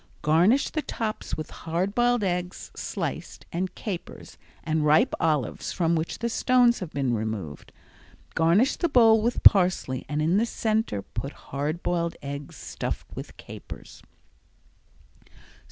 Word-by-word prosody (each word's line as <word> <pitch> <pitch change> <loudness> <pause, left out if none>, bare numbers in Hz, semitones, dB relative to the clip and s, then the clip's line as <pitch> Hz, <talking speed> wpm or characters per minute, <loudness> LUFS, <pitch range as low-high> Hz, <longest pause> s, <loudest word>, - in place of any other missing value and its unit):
Garnish 175 - +3
the 310 - -1
tops 220 -6 -4
with 155 0 -6
hard 175 +5 -2
boiled 240 -1 +2
eggs, 180 -1 -3
sliced, - - -5
and 185 +2 -2
capers, 190 -6 -7 0.3
and 155 -1 0
ripe 155 - +4
olives 150 -8 0
from 170 -2 +1
which 160 0 -2
the 235 - -2
stones 245 0 +3
have 185 -5 -5
been 135 -4 -1
removed. 105 -9 -4 0.6
Garnish 175 - +3
the 345 - 0
bowl 225 -5 +6
with 235 +2 -1
parsley 180 - +5
and 150 0 -1
in 165 +5 +2
the 225 - +3
center 220 - -1
put 140 +2 -6
hard 150 +5 -4
boiled 170 -1 -1
eggs 140 0 -6
stuffed - - -5
with - - -8
capers. - - -11
175 Hz, 135 wpm, -26 LUFS, 150-220 Hz, 0.6 s, bowl